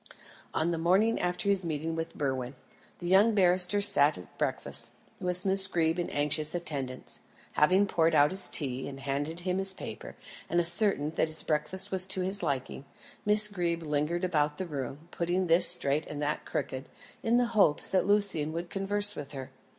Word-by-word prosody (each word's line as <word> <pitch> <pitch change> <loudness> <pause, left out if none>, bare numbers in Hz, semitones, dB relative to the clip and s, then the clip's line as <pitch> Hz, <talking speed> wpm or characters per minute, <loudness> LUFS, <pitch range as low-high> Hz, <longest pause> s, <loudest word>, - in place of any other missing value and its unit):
On 165 +2 -1
the 165 - -3
morning 190 +7 +1
after 180 +1 -3
his 200 -2 +2
meeting 160 0 -4
with 165 0 -6
Berwin, 130 -2 -4 0.4
the 175 - -9
young 200 +5 +3
barrister 185 +1 +2
sat 150 -7 +4
at 90 - -14
breakfast, - - 0 0.3
with 180 +1 -1
Miss 190 0 +4
Greeb 165 -2 -1
in 175 - -3
anxious 150 +2 +2
attendance. 140 -7 -5 0.3
Having 185 +7 +2
poured 165 -4 0
out 145 0 +4
his 190 +1 +1
tea, 130 -3 -2
and 135 -1 -9
handed 145 +5 -4
him 185 +1 -2
his 195 0 0
paper, - - -9 0.3
and 175 - 0
ascertained 170 -3 +3
that - - +1
his 155 0 +1
breakfast 185 +6 -1
was 190 -1 +2
to 190 - +1
his 190 +2 +1
liking, 140 -4 -4 0.4
Miss 210 +1 +7
Greeb 170 -4 -3
lingered 150 +3 -2
about 150 -4 -1
the 190 - -4
room, 145 0 -7
putting 175 +2 -2
this 170 +1 +6
straight 140 +3 +3
and 150 - -7
that 150 +1 -3
crooked, 130 +1 -5 0.3
in 230 +1 +1
the 245 - +2
hope 195 -9 +3
that 190 0 +1
Lucian 200 -7 +1
would 170 +1 -6
converse 205 +1 -2
with 145 0 -9
her. 135 -1 -8
170 Hz, 180 wpm, -28 LUFS, 150-190 Hz, 0.4 s, Miss